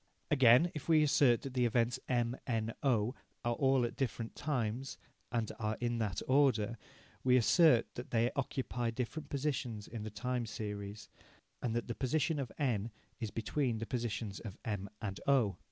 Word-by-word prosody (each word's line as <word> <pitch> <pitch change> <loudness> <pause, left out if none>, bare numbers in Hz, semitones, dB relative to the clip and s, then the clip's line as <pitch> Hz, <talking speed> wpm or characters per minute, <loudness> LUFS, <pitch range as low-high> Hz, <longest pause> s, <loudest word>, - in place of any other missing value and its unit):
Again, 135 +4 +6
if 150 +1 -7
we 155 -2 +6
assert 135 -5 +4
that 135 - -6
the 125 -2 +3
events 120 +1 +1
M, 120 -1 +1
N, 115 -2 -1
O, 120 -5 +2 0.3
are 120 - +2
all 135 0 +3
at 120 - -4
different 115 -3 -3
times, 130 -3 -2 0.3
and 115 -3 -1
are 110 0 -1
in 120 -1 -1
that 105 -6 -1
order, 120 -5 +3 0.4
we 125 0 +5
assert 125 - +5
that 120 - -7
they 120 +1 +2
occupy 125 -3 -1
different 130 +6 -4
positions 130 -7 -2
in 115 -2 -6
the 110 - -4
time 120 +3 -2
series, 105 -1 -5 0.5
and 115 -2 -1
that 120 - -1
the 120 - -2
position 150 +5 0
of 130 -4 -3
N 120 -6 0 0.3
is 110 -3 -3
between 115 +2 -1
the 115 - -3
positions 115 -4 -3
of 105 -5 -8
M 100 -3 -3
and 100 -2 -3
O. 125 -8 +3
120 Hz, 170 wpm, -34 LUFS, 110-135 Hz, 0.5 s, Again